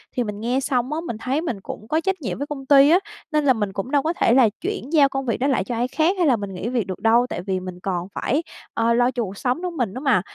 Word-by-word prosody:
Thì 250 - +1
mình 210 -2 -5
nghe 245 +4 0
xong 260 +1 -1
á, 320 - -1
mình 230 - -4
thấy 260 +7 -1
mình 245 - -4
cũng 215 +3 -8
có 315 +5 +1
trách 380 0 -1
nhiệm 250 - -3
với 285 - -4
công 280 -2 -6
ty 275 +1 +7
á, 350 +4 +6 0.3
nên 300 -1 +1
là 265 - +6
mình 205 -4 -2
cũng 195 +7 -4
đâu 285 -2 +3
có 325 - 0
thể 235 - +2
là 250 -4 +6
chuyển 360 -5 -4
giao 285 -3 +6
công 270 0 -3
việc 230 - 0
đó 265 - 0
lại 275 - +1
cho 245 - -4
ai 240 +2 0
khác 320 +7 +1
hay 350 -3 +2
là 260 - +5
mình 200 -3 -5
nghỉ 185 +5 -4
việc 240 -6 -1
được 185 - -5
đâu, 230 +2 +4
tại - - -4
vì 190 0 -2
mình 185 -1 -8
còn 180 -1 -3
phải, 295 +7 0 0.3
ơ, 230 +1 +2
lo 245 +1 +3
cho 245 -2 -2
cuộc 195 -1 -7
sống 255 +6 -1
nữa 365 - -2
mình 245 - -2
nữa 255 - -6
mà. 265 -10 +3
250 Hz, 315 wpm, -22 LUFS, 220-290 Hz, 0.3 s, ty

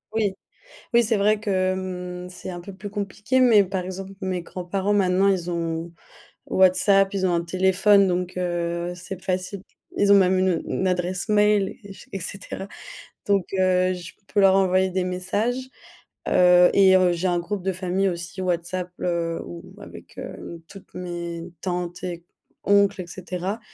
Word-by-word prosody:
Oui. 205 -3 +1 0.6
Oui, 235 - +6
c'est 225 -1 +1
vrai 210 +1 +2
que 185 -3 0
mmh, 180 -1 -5
c'est 185 +1 -8
un 175 -1 -6
peu 195 +3 -9
plus 200 +2 -8
compliqué, 205 +5 -1
mais 225 -5 +6
par 185 -1 -3
exemple 190 +1 -7
mes 185 -2 -2
grands-parents, 190 +3 -3
maintenant, 190 -1 +3
ils 185 -3 +1
ont 165 0 -3 0.5
WhatsApp, 195 +2 +4
ils 190 -1 -1
ont 180 - +2
un 170 - +1
téléphone 190 +3 +4
donc, 180 0 -2
heu, 175 -1 -2
c'est 180 +1 -8
facile. 185 +1 -3 0.3
Ils 200 0 +4
ont - - +9
même 190 -1 +4
une, 190 0 +2
heu, 170 - -1
une 190 - -1
adresse 180 +2 -1
mail 210 -2 +3
et 200 -1 -10
j - - -14
et 195 - -4
cetera. 195 +1 -6 0.6
Donc, 200 -2 +2
heu, 185 -1 +2
je 180 0 -9
peux 205 - +1
leurs 195 0 +6
envoyer 190 0 +3
des 185 0 -1
messages, 205 +8 -2 0.6
heu, 180 0 +6
et 190 -1 +6
heu, 185 -1 +4
j'ai 175 +2 -1
un 175 -1 +1
groupe 195 +2 -4
de 190 - 0
famille 185 +1 0
aussi 175 +1 -5
WhatsApp, 180 0 -2
heu, 170 -1 -1
où 85 0 -8 0.2
avec, - - -13
heu, 170 -1 -8
toutes 195 -1 -14
mes 175 -1 -6
tantes 175 -1 -3
et 170 -2 -5 0.4
oncles 200 -1 +3
et 175 - -10
cetera, 185 +3 -5
185 Hz, 175 wpm, -24 LUFS, 180-195 Hz, 0.6 s, ont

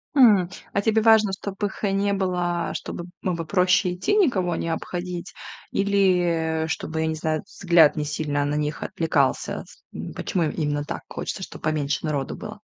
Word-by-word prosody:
Хм. 210 -9 +6 0.3
А 200 - +2
тебе 220 +1 +2
важно, 220 -2 +5
чтобы 200 +1 -3
их 195 - -11
не 200 0 +1
было, 180 -3 -1
чтобы 175 - -5
б - - -13
было 170 -3 -1
проще 180 +1 +3
идти, 190 - 0
никого 190 - +2
не 165 - -3
обходить, 175 +2 -4 0.4
или, 175 -5 +2
э, - - -5
чтобы, 160 0 -3
я 160 - +1
не 160 - -1
знаю, 155 -1 -1
взгляд 170 -5 +4
не 150 -1 -2
сильно 145 -1 -1
на 145 +1 -1
них 150 0 -2
отвлекался? 150 -5 0
С - - -18
м - - -6
почему 175 -3 -1
именно 145 -1 -1
так - - -5
хочется, 190 - -4
чтоб - - -9
поменьше 150 -1 -1
народу 145 -3 -2
было? - - -8
175 Hz, 180 wpm, -24 LUFS, 155-195 Hz, 0.4 s, Хм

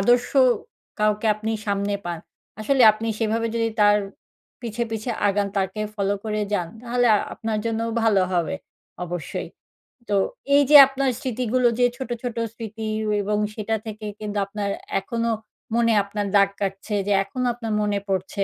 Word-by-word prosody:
আদর্শ 240 +4 +3 0.7
কাউকে 215 +1 +1
আপনি 220 +1 -3
সামনে 200 0 0
পান, 170 -1 -3 0.4
আসলে 265 +3 +3
আপনি 225 +1 -4
সেভাবে 225 0 0
যদি 225 0 +1
তার 205 0 +6 0.7
পিছে, 235 0 -3
পিছে 225 +2 -3 0.2
আগান, 200 0 +1
তাকে 195 +2 -1
ফলো 200 -1 0
করে 215 -1 -1
যান, 175 -4 0
তাহলে 245 0 +1 0.3
আপনার 220 -1 -2
জন্যও 230 0 -1
ভালো 205 -4 +4
হবে, 175 -1 0 0.5
অবশ্যই। 175 -1 -5 0.6
তো 205 - +2 0.4
এই 285 - +7
যে 300 - +7
আপনার 270 0 -1
স্মৃতিগুলো 250 0 0
যে 245 - +5
ছোট, 265 -3 -6
ছোট 245 -1 -4 0.2
স্মৃতি 220 -1 -6 0.4
এবং 210 +1 0 0.2
সেটা 220 0 -1
থেকে 215 0 -7
কিন্তু 210 -1 -4
আপনার, 200 0 -3 0.3
এখনো 230 +3 -2 0.5
মনে 230 -1 +3
আপনার 205 +1 -3
দাগ 200 -1 +6
কাটছে 195 +2 -2
যে, 205 - +3
এখনো 250 +6 -4
আপনার 225 -3 -4
মনে 205 -1 0
পড়ছে, 195 +1 -1
215 Hz, 155 wpm, -23 LUFS, 200-230 Hz, 0.7 s, এই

